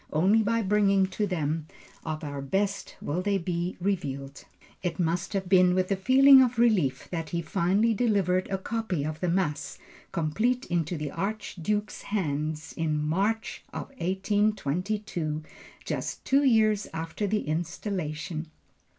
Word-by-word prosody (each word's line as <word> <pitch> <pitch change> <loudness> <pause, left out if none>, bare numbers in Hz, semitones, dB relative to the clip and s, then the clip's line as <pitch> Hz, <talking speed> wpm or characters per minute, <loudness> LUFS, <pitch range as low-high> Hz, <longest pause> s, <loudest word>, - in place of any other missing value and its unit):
Only 190 +8 +4
by 230 +1 +1
bringing 200 -1 +3
to 210 +1 -1
them 160 -3 -2 0.4
of 155 0 -4
our 145 -2 -4
best 195 +8 -1
will 160 +5 -1
they 200 +1 +1
be 175 0 -2
revealed. 140 -8 -3 0.4
It 175 -2 -3
must 175 +3 0
have 190 -2 -1
been 180 -1 +5
with 185 +1 0
a - - +4
feeling 265 +7 +7
of 250 -2 +2
relief 175 - +2
that 165 -3 -3
he 170 0 -2
finally 195 +7 +2
delivered 195 -5 +1
a 195 - 0
copy 210 -5 -2
of 155 +1 -4
the 180 - 0
Mass 170 -4 -1 0.3
complete 215 +11 0
into 170 0 0
the 150 -2 -4
Archduke's 205 +1 -3
hands 155 -5 -2
in 155 -2 -1
March 200 +8 -1
of - - -6
1822, 190 -3 -1 0.4
just - - -4
two 275 +2 +4
years 215 -5 +3
after 165 +6 -3
the 210 +1 +1
Installation. 160 -1 -3
185 Hz, 140 wpm, -27 LUFS, 160-210 Hz, 0.4 s, feeling